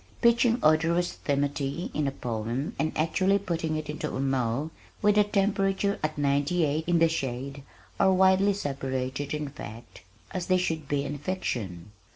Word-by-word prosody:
Pitching 235 0 +4
odorous 165 +3 +3
timothy 140 +3 -1
in 150 -2 0
a - - 0
poem 120 - -3
and 155 - +1
actually 185 +5 +2
putting 165 -5 -2
it 155 -1 -3
into 150 +1 -4
a - - -3
mow 135 +2 0 0.3
with 210 0 +4
the 210 0 +5
temperature 200 -1 +1
at 155 0 -2
ninety 145 +4 +2
eight 155 +2 -1
in 175 -1 +3
the 165 0 +5
shade 135 -3 -3 0.4
are 190 - +5
widely 190 +2 +4
separated 135 -4 -3
in 150 -1 -2
fact 115 -5 -10 0.3
as 185 -2 -3
they 185 - +4
should 160 -5 -2
be 145 -1 0
in 145 +1 -4
fiction. 105 - -3
155 Hz, 165 wpm, -27 LUFS, 140-185 Hz, 0.4 s, the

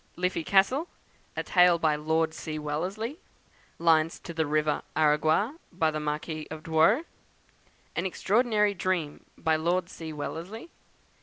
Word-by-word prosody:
"Liffey 180 -2 -1
Castle," 200 - +3 0.5
a - - -1
Tale 180 -2 +5
by 155 -2 +2
Lord 160 +1 0
C. 155 -1 -5
Wellesley. 185 - -3 0.6
"Lines 165 -1 +3
to 170 - -7
the 160 -2 0
River 150 0 +1
Aragua," 155 - +2
by 165 -3 +1
the 155 - -3
Marquis 150 +1 -3
of 155 0 -8
Douro. 165 - +3 0.9
"An - - 0
Extraordinary 210 +2 +2
Dream," 175 -5 -2
by 160 0 +1
Lord 175 +2 0
C. 160 -1 -7
Wellesley. 165 - -6
165 Hz, 135 wpm, -28 LUFS, 155-190 Hz, 0.9 s, Tale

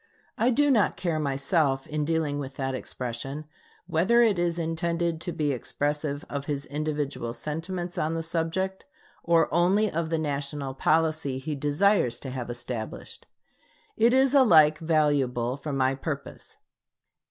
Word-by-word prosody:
I 240 - +2
do 290 +3 +3
not 220 -6 +2
care 170 -4 -1
myself, 140 -1 0
in 150 -1 -2
dealing 155 -3 0
with 140 -1 -6
that 135 -1 -2
expression, 130 +3 -5 0.4
whether 185 +8 +3
it 210 -6 +2
is 175 -1 0
intended 165 0 -1
to 175 - -4
be 150 -3 0
expressive 145 +3 -2
of 140 -1 -5
his 145 -2 -2
individual 145 -5 -3
sentiments 165 +7 -4
on 160 +2 0
the 165 - -2
subject, 170 +4 -2 0.4
or 165 -1 +4
only 190 +5 +3
of 165 0 -2
the 165 - 0
national 140 -2 -3
policy 155 -1 +1
he 150 +4 -4
desires 145 - +2
to 135 - -6
have 125 -2 -5
established. 120 -2 -6 0.7
It 230 +2 +4
is 265 +1 +4
alike 160 - +6
valuable 145 -7 +1
for 145 +2 -6
my 135 -1 +1
purpose. 140 +1 -6
155 Hz, 145 wpm, -27 LUFS, 140-170 Hz, 0.7 s, alike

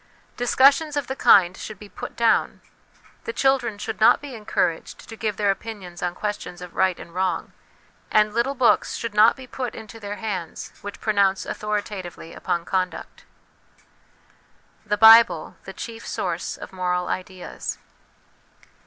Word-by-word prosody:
Discussions 275 +5 +3
of 285 - -1
the 265 - -4
kind 185 -7 +5
should 215 +1 -8
be 210 - -12
put 200 - -8
down; 230 -1 +2 0.6
the 465 - -2
children 270 - +1
should 220 +1 -5
not 220 - +6
be 285 -2 -9
encouraged 210 -7 -2
to 225 - -9
give 215 -2 -3
their 205 -2 +2
opinions 195 -4 -7
on 180 0 -2
questions 205 -4 -5
of 180 -1 -10
right 190 -2 +1
and 170 - -11
wrong, 185 0 -2 0.6
and 210 0 +3
little 240 +5 0
books 250 -3 +2
should 230 -2 -4
not 215 +2 +6
be 260 - -11
put 250 -1 -5
into 220 +1 -10
their 205 -1 -5
hands 195 -7 -5
which 205 0 -8
pronounce 200 -3 +1
authoritatively 205 -5 -5
upon 175 -2 -2
conduct. 185 -1 -3 1.6
The 210 0 +1
Bible 225 -7 +7
the 190 - -7
Chief 230 +3 -8
Source - - -3
of - - -10
Moral 180 -1 -1
Ideas. 185 -1 -5
210 Hz, 150 wpm, -23 LUFS, 185-230 Hz, 1.6 s, Bible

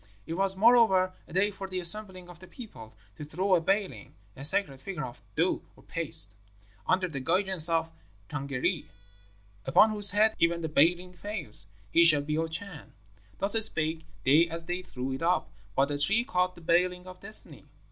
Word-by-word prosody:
It 165 - -6
was, 190 +2 -1
moreover, 195 -4 +3
a - - -15
day 200 +3 +1
for 195 -1 -8
the 185 -1 -5
assembling 185 0 -3
of 175 -1 -14
the 185 - -14
people, 175 - -13 0.2
to - - -8
throw 185 +6 -2
a 175 - +3
Baling 195 - -3 0.2
(a 135 - -10
sacred 140 -3 +2
figure 180 -7 -6
of 120 -4 -12
dough 170 +4 0
or - - -21
paste) 150 - +5 0.5
under 185 0 +1
the 150 -5 -7
guidance 180 +3 +2
of 165 0 -1 0.4
the - - -10
Tângâri. 140 +4 -3 0.8
'Upon 215 +11 +4
whose 205 -1 +7
head 215 +3 +4
even 170 0 +1
the 160 - -4
Baling 175 +5 +1
falls, 175 - -8 0.2
he 170 - +4
shall 155 -4 +4
be 150 +1 -3
our 165 +1 -1
Chan.' 165 0 -6 0.4
Thus 195 +1 0
spake 160 -4 -1 0.2
they 155 +6 +4
as 165 0 -2
they 175 +2 -4
threw 130 -6 -6
it 130 - -6
up; 175 +2 -1 0.2
but 135 - +3
the 145 0 -4
tree 200 +10 +1
caught 180 -2 -1
the - - -15
Baling 180 +2 0
of 185 0 -12
Destiny. 215 +2 0
175 Hz, 190 wpm, -27 LUFS, 155-190 Hz, 0.8 s, whose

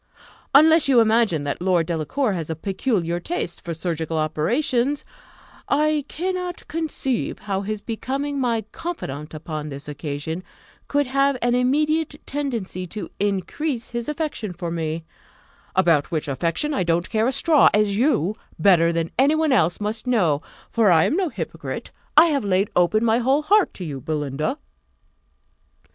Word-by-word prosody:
Unless 320 +2 +7
you 260 -3 +5
imagine 220 -8 +3
that 145 +3 -3
Lord 180 -3 +2
Delacour 180 - -1
has 165 -4 -4
a 160 - -2
peculiar 180 - -1
taste 175 - -4
for 170 - -5
surgical 165 -1 -3
operations, 240 - 0 0.6
I 300 0 +2
cannot 360 +1 -4
conceive 300 -6 -2
how 195 -2 -3
his 210 +1 -4
becoming 275 +6 -3
my 235 -3 +1
confidant 155 - -6
upon 155 -1 -5
this 140 0 -8
occasion 150 +3 -4 0.4
could 285 0 +1
have 275 +1 +2
an 240 0 +2
immediate 300 +5 +1
tendency 230 -10 -3
to 210 +4 -6
increase 225 - -2
his 235 +2 -3
affection 295 - -3
for 170 -1 -5
me 165 -1 -3 0.7
about 170 -6 +3
which 155 -2 -2
affection 170 - -1
I 235 - 0
don't 170 0 +1
care 220 +1 +1
a - - +2
straw, 305 +2 +5
as 210 -1 +2
you, 215 - +2 0.2
better 170 -4 +5
than 165 -1 -2
any 280 +4 +5
one 315 -2 +2
else, 175 -9 +2
must 215 +3 -3
know; 175 - +2 0.3
for 225 -3 +3
I 160 -3 +6
am - - +1
no 370 -2 +1
hypocrite. - - -6 0.3
I 310 - +10
have 290 -5 +1
laid 195 0 +1
open 215 +6 +3
my 225 +1 +3
whole 270 +5 +2
heart 405 +4 +4
to 185 - -5
you, 140 -4 -5
Belinda." 150 - -2
215 Hz, 155 wpm, -23 LUFS, 165-280 Hz, 0.7 s, I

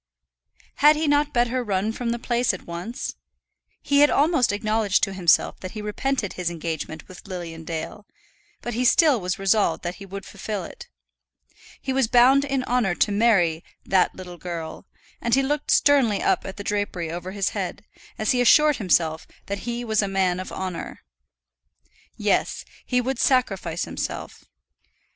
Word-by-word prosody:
Had 295 +2 +6
he 310 +1 -1
not 290 0 +2
better 245 0 +1
run 205 0 -1
from 235 +1 -4
the 235 - -1
place 240 -3 0
at - - -12
once? 175 +10 -6 0.7
He 285 0 +3
had 290 0 +7
almost 295 -5 +3
acknowledged 215 -1 +1
to 195 - +1
himself 180 -4 +2
that 185 - -7
he 215 - -6
repented 210 +1 -2
his 180 -2 -2
engagement 160 -2 -5
with 185 +2 -13
Lilian 170 -4 -7
Dale, 165 +6 -6 0.6
but 240 - -4
he 245 +3 0
still 285 - +4
was 180 0 -2
resolved 195 +2 +1
that 175 +1 -4
he 195 - -8
would 195 +1 -7
fulfil 200 -1 -5
it. - - -10 0.9
He 265 - -3
was 265 -3 +2
bound 255 +4 +5
in 275 -2 -1
honour 240 -8 +1
to 205 - +1
marry 195 -7 +2 0.2
"that 185 -1 +2
little 180 -2 -10
girl," 165 -3 -6 0.3
and 235 +1 +2
he 270 - +2
looked 295 +2 -2
sternly 265 -8 +4
up - - +1
at 190 - -7
the 205 - -6
drapery 200 -5 -2
over 175 +2 -5
his 195 -1 -1
head, 200 +1 -5 0.3
as 215 - +1
he 250 - +2
assured 300 +4 +5
himself 165 -5 +1 0.2
that 200 +4 -5
he 240 0 -3
was 220 -2 +2
a 200 - -1
man 190 -2 0
of 185 - -6
honour. 185 -3 -5 1.2
Yes; - - 0 0.2
he 250 0 +2
would 260 +2 -3
sacrifice 195 -10 +1
himself. - - -6
205 Hz, 170 wpm, -24 LUFS, 180-250 Hz, 1.2 s, had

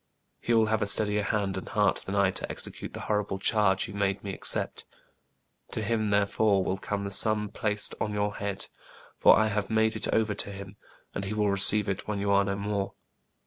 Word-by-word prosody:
He 120 - 0
will 110 -1 +4
have 110 +1 0
a 105 - 0
steadier 105 +1 +3
hand 100 -1 -1
and - - -10
heart 105 -1 +2
than 95 - -5
I 100 -2 +3
to - - -5
execute - - -4
the - - -7
horrible 105 -2 -1
charge 95 -2 +1
you - - -9
made 100 -1 -1
me 100 -1 -5
accept. - - -2 0.9
To 110 - -3
him, 110 0 0
therefore, 100 0 +2
will 95 +1 -2
come 100 0 -3
the 100 - -5
sum 105 0 +2
placed 105 0 0
on 105 - -1
your 105 0 -2
head; 100 -1 -3 0.5
for - - +7
I 110 0 +2
have 105 -1 -2
made 110 0 +2
it 110 - -2
over 110 -2 +1
to 100 0 -3
him, 100 0 -9 0.4
and 100 - -4
he 105 +2 -4
will 105 -1 +1
receive 100 +1 +6
it 95 -1 -4
when 105 -1 -2
you 100 0 -1
are 100 0 +4
no 100 0 -2
more. 100 0 -3
105 Hz, 215 wpm, -27 LUFS, 100-105 Hz, 0.9 s, for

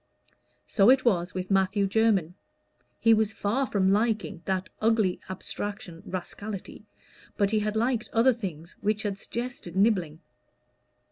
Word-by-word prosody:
So 200 +1 +4
it 255 0 +5
was 185 -6 +1
with 185 +1 -4
Matthew 195 +1 +2
Jermyn. 195 -5 +2 0.7
He 225 - +5
was 220 -1 +2
far 245 +8 0
from 190 -2 +2
liking 215 -4 0
that 190 0 -1
ugly 215 -4 +2
abstraction 190 -2 -6
rascality, 195 +2 -7 0.5
but 200 -1 +2
he 215 - +2
had 210 0 -2
liked 235 0 0
other 240 +3 +4
things 175 -8 -7
which 210 +1 0
had 200 -2 -3
suggested 235 -8 -6
nibbling. 190 -7 +2
205 Hz, 135 wpm, -27 LUFS, 185-225 Hz, 0.7 s, it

